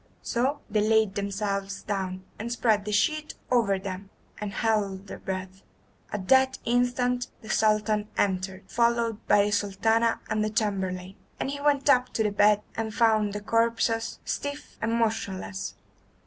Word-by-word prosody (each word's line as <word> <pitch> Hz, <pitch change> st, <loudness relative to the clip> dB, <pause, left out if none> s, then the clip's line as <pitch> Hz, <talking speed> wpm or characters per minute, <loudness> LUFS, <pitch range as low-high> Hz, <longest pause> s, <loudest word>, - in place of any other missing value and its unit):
So 260 Hz, +5 st, 0 dB
they 210 Hz, -1 st, +1 dB
laid 220 Hz, -1 st, +3 dB
themselves 200 Hz, -1 st, -2 dB
down, 190 Hz, -2 st, -3 dB, 0.2 s
and 230 Hz, +3 st, -4 dB
spread 220 Hz, -4 st, +2 dB
the 210 Hz, -, -3 dB
sheet 305 Hz, +9 st, +1 dB, 0.2 s
over 225 Hz, -6 st, +3 dB
them, 190 Hz, 0 st, -6 dB, 0.3 s
and 210 Hz, -1 st, -4 dB
held 200 Hz, -3 st, 0 dB
their -, -, -8 dB
breath. 190 Hz, 0 st, -5 dB, 0.5 s
At 195 Hz, -3 st, -4 dB
that 265 Hz, 0 st, +5 dB
instant 245 Hz, +1 st, +1 dB, 0.2 s
the 215 Hz, -, -5 dB
Sultan 215 Hz, -1 st, +2 dB
entered, 190 Hz, 0 st, 0 dB
followed 235 Hz, -2 st, +1 dB
by 205 Hz, 0 st, +5 dB
the 210 Hz, -, -1 dB
Sultana 220 Hz, +3 st, +2 dB
and 215 Hz, -1 st, 0 dB
the 215 Hz, -, 0 dB
chamberlain, 195 Hz, -3 st, -2 dB, 0.2 s
and 270 Hz, -, -1 dB
he 285 Hz, 0 st, -5 dB
went 285 Hz, -1 st, +2 dB
up 255 Hz, -3 st, +5 dB
to 220 Hz, -, +1 dB
the 210 Hz, -, +1 dB
bed 205 Hz, +1 st, +4 dB
and 220 Hz, -1 st, -3 dB
found 215 Hz, -3 st, +3 dB
the 205 Hz, -, -4 dB
corpses 230 Hz, +1 st, +1 dB
stiff 285 Hz, 0 st, -4 dB
and 225 Hz, 0 st, 0 dB
motionless. 215 Hz, -4 st, -2 dB
215 Hz, 155 wpm, -27 LUFS, 200-235 Hz, 0.5 s, that